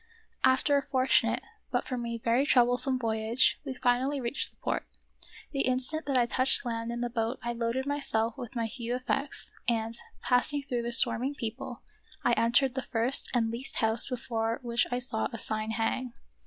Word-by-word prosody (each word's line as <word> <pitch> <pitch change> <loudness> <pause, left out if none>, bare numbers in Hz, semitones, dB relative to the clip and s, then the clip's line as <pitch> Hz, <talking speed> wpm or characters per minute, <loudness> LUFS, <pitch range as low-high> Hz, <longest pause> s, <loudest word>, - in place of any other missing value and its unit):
After 265 +2 +4
a - - +1
fortunate, 260 -1 +2 0.3
but - - -1
for 255 - -3
me 235 -1 -4
very 230 +3 +1
trouble 245 -4 +4
some 255 +1 +1
voyage, 225 0 +1
we 270 -3 -5
finally 255 +4 +1
reached 245 +2 +2
the - - -23
port. - - -3 0.6
The 275 - -1
instant 260 +5 -1
that 275 -2 +2
I 245 - +4
touched 255 +3 +2
land 230 -1 -3
in 240 0 -4
the 240 - 0
boat 230 +1 -1
I 240 0 -2
loaded 235 +3 -2
myself 235 -6 0
with 250 -2 -8
my 230 -1 -1
few 235 +1 -4
effects, 270 +2 -3 0.2
and, 225 -1 -1 0.3
passing 275 +3 +2
through 250 -3 -2
the 235 0 -3
swarming 250 +2 +5
people, 240 0 -6 0.4
I - - +4
entered 245 +3 +3
the 265 - -2
first 245 +2 +1
and 225 -2 +1
least 240 +4 -5
house 220 +1 +4
before 230 -3 -2
which 235 0 +1
I 245 - 0
saw 245 -3 0
a 230 - -6
sign 215 0 -1
hang. 230 +2 -2
245 Hz, 185 wpm, -29 LUFS, 230-260 Hz, 0.6 s, swarming